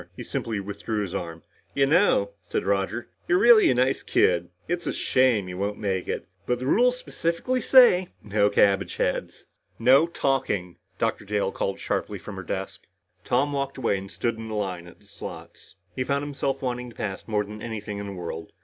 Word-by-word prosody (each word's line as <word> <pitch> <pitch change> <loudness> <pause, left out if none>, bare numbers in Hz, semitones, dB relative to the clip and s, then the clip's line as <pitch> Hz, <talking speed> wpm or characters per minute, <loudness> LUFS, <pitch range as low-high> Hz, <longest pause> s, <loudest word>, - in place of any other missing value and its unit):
He - - -6
simply 110 -3 -3
withdrew 105 +2 -3
his 95 - -6
arm. 85 -1 -5 0.3
"You 140 - +4
know," 145 - +3
said 90 - -3
Roger, 100 +4 -1 0.2
"you're 175 - +4
really 235 +1 +7
a 130 - +3
nice 130 +2 +2
kid. 85 -1 +2 0.2
It's 175 +1 -2
a - - 0
shame 125 -7 +2
you 90 0 -6
won't 100 +1 -2
make 95 -3 -2
it. - - -3 0.2
But 125 - +1
the 130 - -5
rules 245 - +3
specifically 250 +4 -2
say 235 -9 +6 0.2
'no 105 0 +2
cabbageheads.'" 95 -3 +1 0.3
"No 135 +7 +5
talking!" 130 - -1 0.2
Dr. - - -1
Dale 100 -1 -1
called 95 - -3
sharply - - -2
from - - -9
her - - -4
desk. - - -5 0.4
Tom 145 +1 +1
walked 140 -1 -2
away 115 -6 +1
and 95 0 -9
stood 115 +2 -2
in 115 0 -7
the 110 - -4
line 90 -4 -3
at 85 - -14
the - - -23
slots. - - -10 0.2
He 130 - 0
found 140 +2 0
himself 140 -1 -2
wanting 125 -1 -3
to 115 - -15
pass 95 -2 -5
more 105 -2 +1
than 105 +1 -9
anything 105 -3 -5
in 100 - -5
the 100 - -6
world. 85 -3 -6
110 Hz, 195 wpm, -25 LUFS, 100-135 Hz, 0.4 s, really